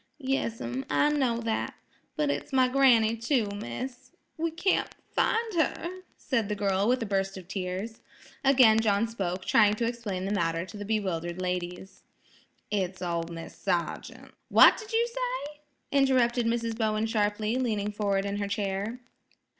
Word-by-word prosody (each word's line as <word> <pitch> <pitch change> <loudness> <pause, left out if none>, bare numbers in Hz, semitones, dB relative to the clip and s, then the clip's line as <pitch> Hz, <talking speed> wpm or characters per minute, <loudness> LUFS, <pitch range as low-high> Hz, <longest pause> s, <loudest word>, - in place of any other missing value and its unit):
"Yes'm; 230 - -2
I 145 - +3
know 255 -6 +1
that. 225 -1 -2 0.4
But 300 -2 +1
it's - - -4
my 260 -1 +4
granny, 250 -4 +4
too, 230 +1 +1
miss. 205 - -6 0.3
We 330 0 -1
can't 350 +4 0 0.2
find 450 -1 +1
her," 345 +2 -1 0.2
said 230 -6 -1
the 210 - -1
girl 200 0 +1
with 250 0 +2
a - - -3
burst 195 -1 -1
of 185 -2 -10
tears. 190 +4 -4 0.4
Again 255 -5 +6
John 215 0 +2
spoke, 190 -5 -3
trying 210 -1 +4
to 230 - -1
explain 220 -6 -3
the 195 - -2
matter 165 -2 0
to 200 - -12
the 205 - -6
bewildered 185 -5 -2
ladies. 180 +1 -4 0.7
"It's 185 -3 -2
ol' 170 -1 -1
Mis' 165 -1 -8
Sargean'–" 170 -1 -3 0.2
"What - - +8
did 435 +2 -9
you 460 +1 +2
say?" - - -4 0.3
interrupted 255 -4 +3
Mrs. 230 -1 -1
Bowen 220 -1 0
sharply, 215 +1 0
leaning 210 -5 -1
forward 200 -2 0
in 200 0 -2
her 200 -1 -2
chair. 205 +3 -3
220 Hz, 155 wpm, -28 LUFS, 195-255 Hz, 0.7 s, What